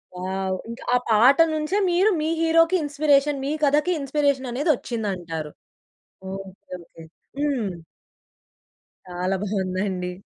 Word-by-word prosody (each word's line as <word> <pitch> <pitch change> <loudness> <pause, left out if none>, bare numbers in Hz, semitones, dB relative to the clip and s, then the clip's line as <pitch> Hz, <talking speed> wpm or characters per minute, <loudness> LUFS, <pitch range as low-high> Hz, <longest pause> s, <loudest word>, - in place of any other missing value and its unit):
Wow. 190 +1 -2
ఇంకా 235 +3 -8
ఆ - - +6
పాట 235 +5 +6 0.2
నుంచే 310 +5 -1
మీరు, 360 +4 +3
మీ 310 - 0
హీరోకి 330 +2 +4
ఇన్‌స్పిరేషన్ 290 -1 +2
మీ 280 - -1
కథకి 295 +5 +3
ఇన్‌స్పిరేషన్ 280 -2 0
అనేది 285 +7 -1
వచ్చిందంటారు. 180 -11 -4 0.8
Okay, 195 -1 -10
okay. 165 - -15 0.4
హ్మ్. 275 -8 0 1.4
చాలా 180 +2 -2
బాగుందండి. 190 -2 -2
245 Hz, 110 wpm, -23 LUFS, 190-295 Hz, 1.4 s, ఆ